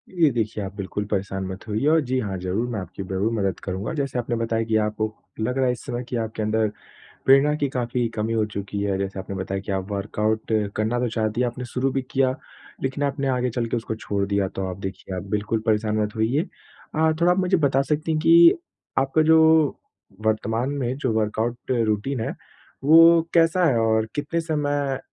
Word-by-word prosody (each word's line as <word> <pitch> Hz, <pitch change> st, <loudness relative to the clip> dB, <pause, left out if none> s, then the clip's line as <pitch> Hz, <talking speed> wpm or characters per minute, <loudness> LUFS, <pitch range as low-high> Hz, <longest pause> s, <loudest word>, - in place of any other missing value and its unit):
ये 165 Hz, -4 st, +5 dB
देखिए 110 Hz, -2 st, -2 dB
आप 95 Hz, 0 st, -7 dB
बिल्कुल 100 Hz, +1 st, -4 dB
परेशान 95 Hz, -1 st, -2 dB
मत 95 Hz, +3 st, -7 dB
होइए 110 Hz, +7 st, 0 dB
और 160 Hz, 0 st, +5 dB
जी 130 Hz, -1 st, -1 dB
हाँ, 100 Hz, -5 st, -3 dB
ज़रूर 95 Hz, +7 st, -1 dB
मैं 105 Hz, -, -2 dB
आपकी 95 Hz, +1 st, -7 dB
ज़रूर 95 Hz, +4 st, -1 dB
मदद 100 Hz, -5 st, -1 dB
करूँगा, 95 Hz, -, -3 dB
जैसे 140 Hz, -4 st, -2 dB
आपने 120 Hz, 0 st, -2 dB
बताया 115 Hz, 0 st, 0 dB
कि 110 Hz, -, 0 dB
आपको 110 Hz, 0 st, -2 dB, 0.3 s
लग 125 Hz, +4 st, -1 dB
रहा 130 Hz, -, +2 dB
है 125 Hz, -, +3 dB
इस 125 Hz, -, -5 dB
समय 125 Hz, -2 st, -3 dB
कि 125 Hz, -, -3 dB
आपके 110 Hz, -1 st, -3 dB
अंदर 110 Hz, 0 st, +1 dB, 0.6 s
प्रेरणा 135 Hz, +2 st, +6 dB
की 145 Hz, -, 0 dB
काफ़ी 120 Hz, -2 st, -1 dB
कमी 110 Hz, +1 st, -1 dB
हो 110 Hz, -1 st, +2 dB
चुकी 100 Hz, -1 st, -5 dB
है। 100 Hz, -1 st, 0 dB
जैसे 95 Hz, 0 st, -3 dB
आपने 95 Hz, +1 st, -6 dB
बताया 95 Hz, +1 st, -3 dB
कि 100 Hz, -, -5 dB
आप 95 Hz, +1 st, -3 dB
वर्कआउट 105 Hz, +2 st, -1 dB, 0.2 s
करना 110 Hz, +3 st, 0 dB
तो 125 Hz, -, +1 dB
चाहती 110 Hz, +1 st, -1 dB
हैं, 125 Hz, -, +2 dB
आपने 125 Hz, +1 st, -5 dB
शुरू 130 Hz, +2 st, -1 dB
भी 135 Hz, 0 st, -1 dB
किया 130 Hz, -1 st, +2 dB, 0.5 s
लेकिन 135 Hz, +2 st, -1 dB
आपने 140 Hz, 0 st, -1 dB
आगे 125 Hz, -1 st, +1 dB
चल 120 Hz, 0 st, -2 dB
के 120 Hz, -, 0 dB
उसको 110 Hz, -1 st, -4 dB
छोड़ 100 Hz, -2 st, -2 dB
दिया 100 Hz, -1 st, +1 dB
तो 95 Hz, -, -2 dB
आप 90 Hz, -, -6 dB
देखिए 95 Hz, -1 st, -6 dB
आप -, -, -4 dB
बिल्कुल 105 Hz, +1 st, -1 dB
परेशान 110 Hz, 0 st, +1 dB
मत 105 Hz, +1 st, -4 dB
होइए। 115 Hz, +7 st, +1 dB, 0.5 s
अ, 160 Hz, 0 st, +3 dB
थोड़ा 175 Hz, +1 st, +5 dB
आप 180 Hz, -, +1 dB
मुझे 185 Hz, 0 st, +2 dB
बता 135 Hz, -3 st, +2 dB
सकती 150 Hz, +3 st, -1 dB
हैं 155 Hz, -, +1 dB
कि 340 Hz, -, +8 dB, 0.5 s
आपका 135 Hz, +4 st, +2 dB
जो 160 Hz, +1 st, +6 dB, 0.9 s
वर्तमान 110 Hz, +3 st, 0 dB
में 125 Hz, +2 st, -1 dB
जो 130 Hz, -4 st, -1 dB
वर्कआउट 115 Hz, +4 st, -2 dB
रूटीन 115 Hz, +2 st, 0 dB
है -, -, -2 dB, 0.5 s
वो 165 Hz, +3 st, +7 dB
कैसा 170 Hz, +1 st, +4 dB
है? 130 Hz, -7 st, +3 dB
और 110 Hz, -1 st, +2 dB
कितने 150 Hz, +3 st, -1 dB
समय 145 Hz, -4 st, -1 dB
115 Hz, 210 wpm, -24 LUFS, 105-135 Hz, 0.9 s, कि